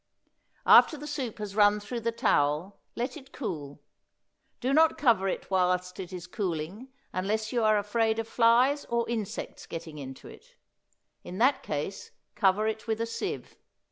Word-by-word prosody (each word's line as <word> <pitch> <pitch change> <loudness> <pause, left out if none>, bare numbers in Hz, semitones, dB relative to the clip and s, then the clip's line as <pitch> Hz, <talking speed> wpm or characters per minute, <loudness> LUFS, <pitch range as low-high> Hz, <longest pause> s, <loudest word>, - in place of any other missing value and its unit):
After 310 - +7
the 295 - -8
soup 270 -7 -4
has 210 -2 -6
run 210 0 +5
through 235 +4 -5
the 230 0 -1
towel 150 -2 +1 0.2
let 250 +2 -3
it 275 -2 -12
cool; 145 - -6 0.8
do 260 +2 0
not 320 +2 +5
cover 225 -8 +3
it 195 - -4
while 180 -1 +3
it 180 0 -4
is 180 -2 -6
cooling 180 +3 -4 0.3
unless 215 +4 -1
you 240 -2 +1
are 215 -1 +4
afraid 220 +2 +1
of 225 -1 -2
flies 245 +5 +4
or 235 0 -1
insects 225 -4 -4
getting 160 -2 -7
into 135 -1 -9
it; - - -15 0.7
in 180 - -7
that 260 +5 +3
case 150 +6 -4 0.2
cover 195 +2 +2
it 220 +1 -3
with 220 0 -1
a 230 - 0
sieve. 230 0 -5
215 Hz, 165 wpm, -28 LUFS, 180-235 Hz, 0.8 s, After